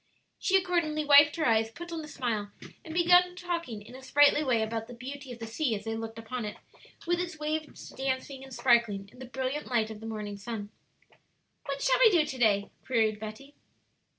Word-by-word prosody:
She 385 - +3
accordingly 335 -5 0
wiped 290 +1 +7
her 320 - 0
eyes, 225 -1 +3
put 345 +9 -9
on 325 -2 -4
a - - -8
smile, 230 -8 -2 0.3
and 320 - -9
began 355 +1 +5
talking 340 - -4
in 225 - -13
a 260 - -10
sprightly 290 +2 +4
way 240 -5 +2
about 225 0 -3
the 245 - -10
beauty 265 +2 -8
of 240 - -7
the 230 - -6
sea 230 +1 -1
as 205 - -6
they 225 0 -2
looked 225 0 -6
upon 225 +2 -5
it, 210 -1 -5 0.5
with 350 +1 +1
its 355 -3 -4
waves 305 0 -4
dancing 265 0 -3
and 270 - -12
sparkling 235 -6 +2
in 250 - -17
the 260 - -7
brilliant 265 +3 -3
light 225 -3 0
of 215 - -8
the 225 - -8
morning 210 -2 -5
sun. 205 0 -6 1.0
"What 275 0 -3
shall - - +3
we - - +8
do 340 -7 +3
to 270 -3 -6
day?" 205 -4 +2
queried 220 -4 +1
Betty. 220 +7 -8
260 Hz, 205 wpm, -29 LUFS, 225-305 Hz, 1.0 s, we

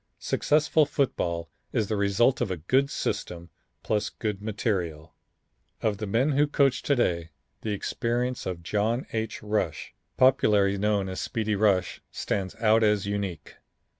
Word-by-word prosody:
Successful 150 0 +2
football 85 - -1 0.2
is 110 - 0
the 110 - -1
result 100 +6 +2
of 120 - 0
a 95 - -2
good 130 - +2
system, 85 -9 -4 0.3
plus 105 -1 0
good 105 -3 -4
material. 90 -8 -2 0.7
Of 105 -2 -1
the 110 - -3
men 120 +9 +2
who 145 +2 +3
coach 135 -3 +2
to 140 - +1
day, 85 -9 0 0.3
the 110 - -4
experience 120 +4 -2
of 85 -2 -4
John 110 +7 0
H. 110 -2 -3
Rush, 105 -6 -2 0.2
popularly 100 -6 +4
known 105 -1 +1
as 95 0 -4
Speedy 110 -1 -1
Rush, 100 -3 +1
stands 95 -2 -3
out 110 0 +3
as 105 -2 +2
unique. 100 -6 -4
105 Hz, 145 wpm, -27 LUFS, 95-120 Hz, 0.7 s, popularly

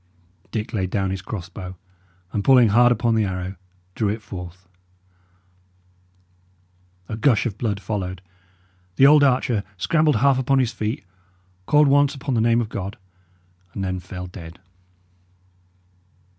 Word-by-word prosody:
Dick 110 -1 -4
laid 95 -4 -1
down 95 -1 -1
his 95 -1 -4
cross 95 -4 -6
bow, 95 -1 -8 0.6
and 100 - -1
pulling 125 -3 +6
hard 120 +4 +5
upon 115 0 +1
the 110 -1 +2
arrow, 95 -1 -4 0.4
drew 105 0 0
it 110 +2 -4
forth. 90 0 -9 2.4
A 110 - -4
gush 115 +1 +2
of 110 -5 -2
blood 105 -4 -1
followed; 95 -2 -4 0.8
the 135 - +5
old 150 +1 +7
archer 125 -5 +2
scrambled 155 - +2
half 130 +4 +3
upon 135 +1 +2
his 125 -2 +1
feet, 115 +5 -4 0.6
called 150 0 +5
once 145 +1 +3
upon 135 0 -3
the 115 - +2
name 115 +1 +3
of 110 - -4
God, 100 -2 -5 0.8
and 100 - -3
then 95 -1 -2
fell 90 0 -8
dead. 85 -2 -10
110 Hz, 145 wpm, -22 LUFS, 95-125 Hz, 2.4 s, old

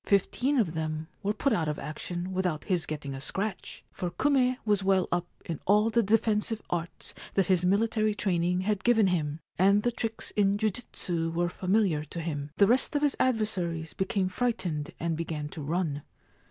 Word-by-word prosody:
Fifteen 245 +7 +2
of 195 -10 +2
them 155 -1 -3
were 205 0 0
put 240 +5 +1
out 165 -7 +1
of 150 -1 -1
action 175 +4 -5
without 180 -4 -1
his 180 -5 0
getting 145 -3 -4
a 135 - -6
scratch, 195 +5 -3
for 180 - -3
Kume 255 +2 +2
was 205 -2 +3
well 190 -1 +3
up 175 0 0 0.2
in 165 -3 -4
all 210 +3 +4
the 235 - +4
defensive 220 +1 +2
arts 170 0 -3 0.2
that 195 - +3
his 180 -1 +2
military 215 +3 +2
training 180 -2 +1
had 200 0 -1
given 225 -2 +5
him, 160 -4 0 0.2
and 200 +3 +5
the 240 - +2
tricks 225 -1 -3
in 200 -1 +2
jujitsu 185 -6 -1
were 175 +1 0
familiar 185 -4 +1
to 170 - -7
him. 150 -3 -3
The 200 - +7
rest 250 +7 +2
of 290 - +1
his 290 -2 +3
adversaries 185 -9 0
became 190 0 0
frightened 185 -8 -1
and 165 -1 -1
began 155 -2 -4
to 155 - -7
run. 150 -1 -1
185 Hz, 180 wpm, -29 LUFS, 165-215 Hz, 0.2 s, The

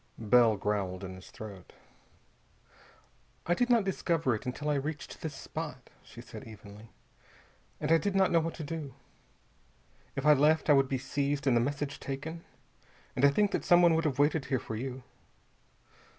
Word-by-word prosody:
Bell 115 -1 +4
growled 100 -2 -2
in 95 -1 -6
his 95 0 -12
throat. 100 -4 -10 1.7
"I 175 - +2
did 245 +7 +1
not 235 -3 +4
discover 165 -7 0
it 110 - -5
until 145 +4 -4
I 150 - +2
reached 145 +2 -4
this 155 -3 -5
spot," 150 -4 -7
she 120 - -12
said 125 +1 -10
evenly. 105 0 -12 0.9
"And 155 +1 -1
I 165 - +6
did 200 +1 -2
not 190 -1 +3
know 170 - +5
what 165 0 -3
to 160 - -6
do. 150 -2 -6 1.2
If 135 0 -3
I 150 - +8
left, 150 +2 +3
I - - +8
would 135 -1 +3
be 135 - 0
seized 140 +2 -2
and 130 -3 +3
the 120 - +4
message 145 +2 -3
taken 160 +5 -6 0.7
and 125 - -1
I 140 - +8
think 205 +8 +2
that - - -1
someone 175 -1 +6
would 165 0 +1
have 140 -4 0
waited 145 0 +2
here 130 - 0
for 110 - -6
you. 130 +2 -5
140 Hz, 180 wpm, -30 LUFS, 120-160 Hz, 1.7 s, I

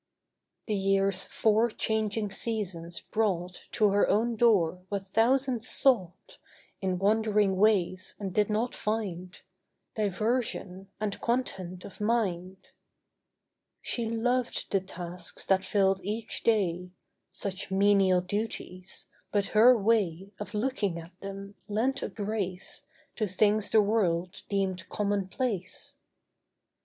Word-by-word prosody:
The 215 - -2
year's 195 -1 +2
four 220 +2 +2
changing 215 -1 -1
seasons 185 -7 -3
brought 180 -5 -2
To 210 -3 +3
her 200 +1 +3
own 230 +3 +2
door 195 -7 +3
what 195 -1 -4
thousands 250 +1 +2
sought 245 - +1 0.4
In 185 -2 0
wandering 210 0 +2
ways 185 -2 +2
and 195 -3 -5
did 210 +1 +2
not 220 +3 0
find— 190 -5 -3 0.6
Diversion 210 -2 -1
and 210 -2 -3
content 185 -7 -2
of 200 - -11
mind. 190 -5 -1 1.1
She 235 -2 -1
loved 245 +2 0
the 195 - +2
tasks 175 -1 -5
that 190 -1 +3
filled 195 0 +2
each 215 +3 -3
day— 180 -5 +1 0.4
Such 195 -1 -5
menial 195 -1 +4
duties; 185 -2 -4 0.2
but 205 -1 +1
her 235 +3 +7
way 200 -4 +1
Of 210 +1 -6
looking 210 -6 0
at 165 +1 -9
them 195 0 -7
lent 240 +6 0
a - - -3
grace 205 +4 -4 0.3
To 215 - 0
things 205 +2 +2
the 215 -1 +5
world 185 -5 0
deemed 190 -3 -1
commonplace. 200 0 -2
200 Hz, 115 wpm, -29 LUFS, 185-220 Hz, 1.1 s, her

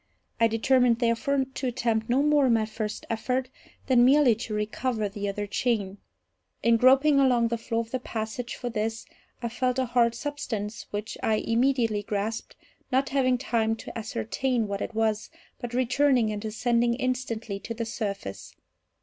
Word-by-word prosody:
I 230 - +5
determined, 240 +1 +3
therefore, 260 +4 +1
to 260 0 -5
attempt 230 -3 -1
no 260 +4 +3
more, 295 -2 +4
in 240 - +4
my 220 -1 +2
first 215 -1 -5
effort, 250 +3 -1 0.4
than 250 -3 +5
merely 265 -1 +6
to 220 0 -5
recover 215 +1 -1
the 200 0 -4
other 205 +1 -3
chain. 205 -2 -1 0.6
In 230 0 +5
groping 270 +4 +5
along 245 -4 +3
the 235 - -1
floor 230 0 -1
of 230 0 -9
the 255 - -1
passage 230 +1 -4
for 245 - -5
this, 225 -1 -2 0.4
I 235 - -1
felt 250 +2 -1
a 260 - +1
hard 235 -1 +2
substance, 230 -7 -4
which 210 +1 -5
I 220 - +2
immediately 230 -1 +1
grasped, 205 +2 -3 0.4
not 265 +2 +2
having 255 -2 +2
time 225 -3 0
to - - -10
ascertain 225 - -1
what 200 0 -3
it 230 - -4
was, 220 -1 0 0.3
but 240 0 -5
returning 255 -2 +3
and 210 0 -4
ascending 235 +2 +1
instantly 240 -5 -3
to 230 - -6
the 230 0 -3
surface. 200 - -5
235 Hz, 165 wpm, -27 LUFS, 220-255 Hz, 0.6 s, merely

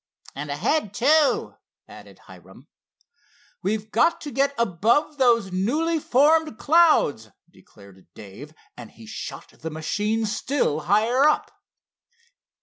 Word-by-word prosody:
"And 145 +1 -7
ahead, 205 - -1
too," 295 +5 +2 0.3
added - - -15
Hiram. - - -16 0.9
"We've 215 +1 -3
got 335 +9 +2
to 295 - -7
get 275 +1 0
above 235 - 0
those 230 -6 +2
newly 300 - -1
formed 305 0 +2
clouds," 290 - +2 0.2
declared 100 -2 -19
Dave, 105 +9 -12 0.2
and 120 -3 -11
he 115 - -16
shot 110 - -8
the 160 - -9
machine 210 +8 -2
still 215 - -1
higher 215 - +2
up. 305 - -1
220 Hz, 115 wpm, -23 LUFS, -, 0.9 s, too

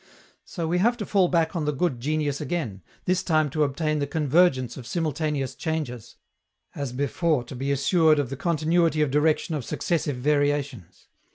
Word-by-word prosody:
So 170 -3 -4
we 175 +2 +1
have 235 +5 +2
to 210 - -4
fall 190 -3 +3
back 165 -1 +1
on 160 -3 -1
the 150 - +1
good 140 -3 -1
genius 145 +1 -1
again, 130 - -3 0.2
this 180 0 +1
time 155 -6 +1
to 155 +1 +1
obtain 155 +2 -1
the 140 - -1
convergence 150 -3 +2
of 125 -3 -9
simultaneous 150 -4 -2
changes, 150 -8 -4 0.6
as 140 -3 -4
before 145 +2 0
to 120 - -10
be 135 +3 -2
assured 155 +3 +3
of 140 -3 -1
the - - -3
continuity 165 0 +1
of 145 - -1
direction 155 +3 +1
of 150 -4 -2
successive 155 +1 -1
variations. 145 - -1
150 Hz, 175 wpm, -25 LUFS, 140-165 Hz, 0.6 s, fall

